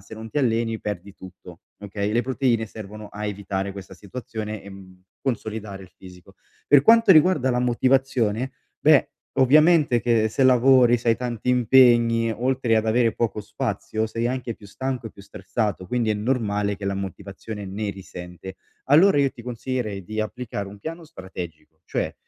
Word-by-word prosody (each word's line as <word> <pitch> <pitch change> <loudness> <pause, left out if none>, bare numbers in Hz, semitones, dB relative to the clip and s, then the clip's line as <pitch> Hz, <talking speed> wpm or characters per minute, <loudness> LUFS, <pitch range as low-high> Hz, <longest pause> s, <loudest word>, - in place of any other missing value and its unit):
se 105 - -11
non 110 +1 -8
ti 150 - -10
alleni 115 -4 +1
perdi 100 -1 -6
tutto, 90 -2 -13 0.2
okay, 100 +1 -3
le 120 - +2
proteine 125 -3 0
servono 105 0 -9
a 105 +1 -7
evitare 100 -1 -3
questa 95 -1 -10
situazione 110 +1 -7
e, 100 - -12
mhmm, 95 -1 -14 0.2
consolidare 110 -5 -4
il 90 - -18
fisico. 90 -2 -15 0.3
Per 145 -1 +7
quanto 230 -3 +6
riguarda 155 -4 +4
la 125 0 0
motivazione, 125 -1 +1 0.3
beh, 150 -2 +4 0.3
ovviamente 150 -1 +5
che 115 -2 +2
se 135 +5 -1
lavori, 125 -1 +5
se 120 - -3
hai 115 - +4
tanti 120 -1 -4
impegni, 120 -2 +4
oltre 125 0 0
ad 110 0 0
avere 115 0 +2
poco 110 -2 -2
spazio, 110 +2 -3
sei 115 +2 -2
anche 125 -3 -3
più 100 - -15
stanco 130 +2 -4
e - - -8
più 100 - -15
stressato, 100 -1 -3
quindi 115 +1 0
è - - +1
normale 105 -3 -1
che 100 - -8
la 100 0 -1
motivazione 100 +2 -7
ne 100 +2 -4
risente. 90 -1 -10 0.3
Allora 155 +3 +6
io 140 -1 +3
ti 120 - -13
consiglierei 120 -5 -4
di 110 +2 -4
applicare 110 -3 -5
un 100 +1 -12
piano 165 +6 -7
strategico, 85 - -10
cioè, - - -3
110 Hz, 170 wpm, -23 LUFS, 100-125 Hz, 0.3 s, Per